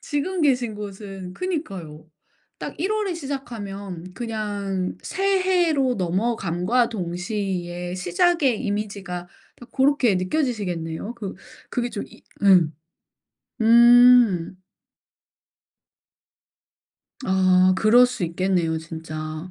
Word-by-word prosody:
지금 345 +5 -2
계신 250 -6 +1
곳은 195 -2 -8
그니까요. 195 - -5 0.5
딱 - - -6
1 375 +6 -1
월에 415 -5 -1
시작하면 205 - -6
그냥 205 -5 -3
새해로 365 -8 +1
넘어감과 195 +4 0
동시에 180 -2 -4
시작의 295 - +1
이미지가 200 -4 -4 0.3
딱 245 -1 -15
고렇게 265 -5 +3
느껴지시겠네요. 185 - -2
그 210 -5 -6 0.4
그게 245 -1 -1
좀 215 - -5
이 - - -18 0.2
음. 180 -6 +5 0.9
음. 235 -5 +6 2.7
아 185 -1 +4
그럴 240 +4 +6
수 245 -7 -3
있겠네요, 170 -1 0
진짜. 160 +1 -7
205 Hz, 195 characters per minute, -23 LUFS, 180-250 Hz, 2.7 s, 음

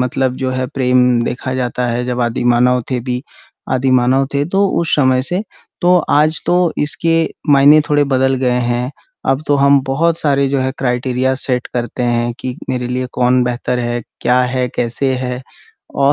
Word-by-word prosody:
मतलब 130 0 -1
जो 130 -1 -2
है 130 0 -2
प्रेम 125 -1 +2 0.3
देखा 130 +1 -4
जाता 125 -1 -2
है 120 +1 -2
जब 125 0 -3
आदिमानव 120 +1 +2
थे 125 - 0
भी 125 0 -2 0.5
आदिमानव 130 +1 +2
थे 140 - +1
तो 200 +1 +4
उस 165 - 0
समय 130 -2 +3
से 180 +8 -2 0.4
तो 180 0 +4
आज 155 +2 +3
तो 175 - +2 0.3
इसके 165 +2 0 0.4
मायने 145 +2 +6
थोड़े 145 -1 +3
बदल 130 +1 +2
गए 125 - +2 0.2
हैं। 120 +2 -1 0.4
अब 135 +3 0
तो 145 - +2
हम 140 0 +4
बहुत 165 +5 +1
सारे 140 -2 +1
जो 140 0 0
है 130 0 0
क्राइटेरिया 130 0 0
सेट 125 -2 -1
करते 120 +1 -3
हैं 120 0 0
कि 125 -1 -5
मेरे 125 -1 -2
लिए 125 +1 -2
कौन 125 0 +2
बेहतर 125 0 -2
है, 120 0 -2 0.2
क्या 125 +1 +2
है, 125 0 -1
कैसे 125 +3 -1
है? 125 0 -4 0.5
औ 140 +1 +3
130 Hz, 180 wpm, -16 LUFS, 125-140 Hz, 0.5 s, मायने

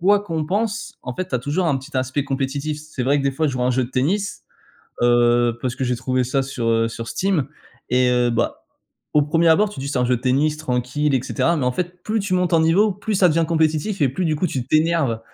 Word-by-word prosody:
quoi 200 +4 +4
qu'on 165 -6 -3
pense, 210 +6 -2
en 125 - -5
fait, 185 +4 -4
tu - - -4
as - - +2
toujours 145 +9 -1
un 145 -4 +2
petit 130 0 -8
aspect 130 +2 -1
compétitif. 140 +2 -2
C'est 155 -4 -6
vrai 140 +3 +3
que, - - -1
des 140 - +2
fois, 155 +4 0
je 140 - -1
joue 125 -1 -2
à - - +2
un - - +2
jeu 130 0 +1
de 120 - -10
tennis, 185 +11 -1 0.6
heu, 120 -1 +3
parce 125 -1 -2
que 130 - -2
j'ai 125 -1 0
trouvé 130 +1 0
ça 135 +2 0
sur, 130 -3 -4
heu, 115 0 +2
sur 115 0 -7
Steam 185 -7 0 0.5
et 125 0 +3
heu, 125 -1 +2
bah, 115 - -1 0.5
au 150 - +5
1er 165 +3 +2
abord, 200 +6 +4
tu 205 - -8
dis: 140 - -4
«Ç'est 140 - -1
un 125 - +2
jeu 125 0 +2
de - - -9
tennis 140 +4 +1
tranquille» 135 +1 -1
et 130 - +1
cetera, 170 +5 0
mais 140 - -1
en 125 - +1
fait, 180 +4 -5
plus 220 +1 0
tu 195 -2 -1
montes 180 -1 +1
en 165 - +5
niveau, 185 +7 +3
plus 205 +3 -4
ça 185 -2 +4
devient 165 +1 +2
compétitif 160 +4 0
et 140 - +4
plus, 175 +8 -3
du 155 -1 0
coup, 180 - 0
tu 130 -6 -4
t'énerves. 155 -7 +1
145 Hz, 265 wpm, -21 LUFS, 125-170 Hz, 0.6 s, au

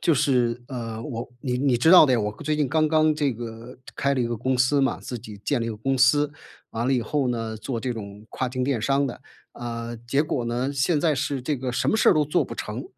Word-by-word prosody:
就 165 - +3
是， 125 -3 +1
呃， 115 -4 -5
我 115 -2 -5
你 125 -2 -2
你 130 -2 +2
知 145 +7 +4
道 180 -4 +9
的 130 - +2
呀， 120 - +3
我 105 0 -1
刚 110 - -11
最 155 +1 +1
近 150 -3 +1
刚 155 +2 +2
刚 155 0 +3
这 145 -3 0
个 115 +1 -8 0.2
开 140 0 +1
了 130 - 0
一 120 - +1
个 120 0 -3
公 130 +4 0
司 130 +3 +3
嘛 135 - +1
自 125 - -6
己 105 -2 -11
建 140 0 +1
了 115 - -2
一 - - -2
个 110 - -6
公 135 +5 -1
司， 145 +3 +4 0.4
完 115 +2 -2
了 135 - +2
以 125 -3 +1
后 140 +4 -1
呢， 115 -2 -3
做 115 +2 -4
这 125 +1 -2
种 105 -2 -9
跨 130 - -2
境 130 +1 -3
电 130 -3 0
商 140 +4 +1
的。 125 - -7 0.3
呃， 120 0 -6
结 135 +4 +2
果 140 -5 -2
呢， 120 +4 -1
现 145 +3 +1
在 155 -1 +2
是 135 -1 -2
这 145 +3 -1
个 125 -1 -4
什 - - 0
么 - - +3
事 - - +4
儿 - - +4
都 155 -1 +3
做 150 - +1
不 - - -8
成。 110 +5 -5
125 Hz, 290 characters per minute, -24 LUFS, 115-140 Hz, 0.4 s, 道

